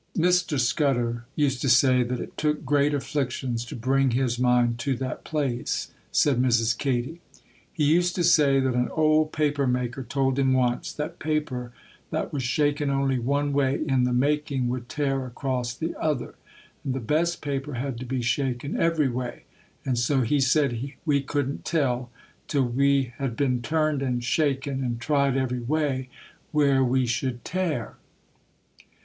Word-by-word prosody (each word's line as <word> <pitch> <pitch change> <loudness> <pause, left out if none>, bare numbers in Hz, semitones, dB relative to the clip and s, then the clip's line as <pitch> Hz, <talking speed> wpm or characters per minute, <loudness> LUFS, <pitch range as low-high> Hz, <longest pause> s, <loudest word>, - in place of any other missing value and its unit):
'Mr. 175 -4 +2
Scudder 120 -3 +1
used 135 -4 +1
to 135 - +1
say 125 +1 +5
that 125 0 -2
it - - -7
took 150 -1 -1
great 145 +2 +3
afflictions 130 -4 -2
to - - -8
bring 135 +3 +2
his 120 -1 0
mind 120 -1 +2
to 135 +1 0
that 130 +1 -5
place,' 135 -6 -2 0.2
said 135 -4 +3
Mrs. 115 -2 +2
Katy. 135 +6 -2 0.5
'He 160 - -2
used 175 +4 +3
to 175 - 0
say 145 -5 +5
that 130 -1 +1
an 125 0 0
old 155 0 +3
paper 145 -3 0
maker 125 +1 -1
told 135 +2 0
him 135 -1 +3
once, 125 -2 0
that 150 - -5
paper 145 -6 -2 0.4
that - - -3
was 140 - -1
shaken 145 +3 +1
only 135 -1 +1
one 140 +4 0
way 140 -1 +1
in 130 -3 +2
the 125 - 0
making 140 0 +1
would 125 0 -4
tear 135 -2 -1
across 125 -1 -2
the 160 +6 -3
other, 150 -6 -1 0.5
and 130 -2 -2
the - - -1
best 160 +8 0
paper 140 -1 -3
had 125 -1 -3
to 130 - -6
be 130 -1 -2
shaken 130 +2 -1
every 165 -4 +2
way; 125 -1 -4 0.4
and 125 -3 0
so 130 +3 +2
he 135 +5 +1
said 135 -1 +1
we 145 -3 +2
couldn't 140 0 -2
tell, 130 -6 0 0.4
till 140 -3 +1
we 135 0 +1
had 135 -4 -2
been 125 -2 0
turned 155 +1 0
and 125 -2 -1
shaken 135 0 0
and 120 -2 -2
tried 140 0 +1
every 125 -2 -1
way, 135 -1 -1 0.4
where 140 -3 +3
we 130 0 +2
should 120 +1 -2
tear. 165 - -2
135 Hz, 165 wpm, -25 LUFS, 125-145 Hz, 0.5 s, say